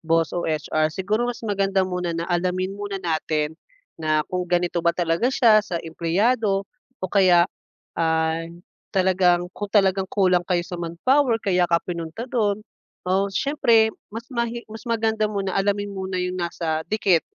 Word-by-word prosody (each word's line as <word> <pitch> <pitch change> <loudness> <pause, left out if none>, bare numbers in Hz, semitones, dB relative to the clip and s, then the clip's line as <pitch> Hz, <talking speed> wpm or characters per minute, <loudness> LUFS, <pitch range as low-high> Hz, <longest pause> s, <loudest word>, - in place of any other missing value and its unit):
boss 165 -1 +1
o 175 -2 -2
HR. 155 0 0
Siguro 205 +8 -1
mas 240 - -4
maganda 195 -2 +1
muna 180 -2 -3
na 170 - -2
alamin 185 +2 0
muna 200 0 -5
natin 160 -3 -1 0.5
na 155 -1 +2
kung 180 -1 -2
ganito 175 0 +1
ba 170 0 +2
talaga 170 +5 +1
siya 230 -5 +5
sa 180 -4 -5
empleyado 195 +6 +1 0.4
o - - 0
kaya 180 -4 +5 0.5
ay 160 0 0 0.4
talagang 180 -2 +3
kung 205 -1 -5
talagang 195 -2 +2
kulang 185 -3 +2
kayo 175 -2 +1
sa 175 -2 -7
manpower 235 - +2
kaya 180 -2 +2
ka 170 - +4
pinunta 170 +5 -5
dun. 215 -3 0 0.5
Oh, 195 +2 +2
siyempre, 230 -3 +3 0.2
mas 230 +1 -6
mahi 235 -1 -2
mas 220 +3 -9
maganda 220 -1 +1
muna 195 -2 -2
alamin 205 +1 0
muna 190 -1 -4
yung 180 0 -3
nasa 165 -2 -2
dikit 195 -5 +2
185 Hz, 155 wpm, -23 LUFS, 170-205 Hz, 0.5 s, siya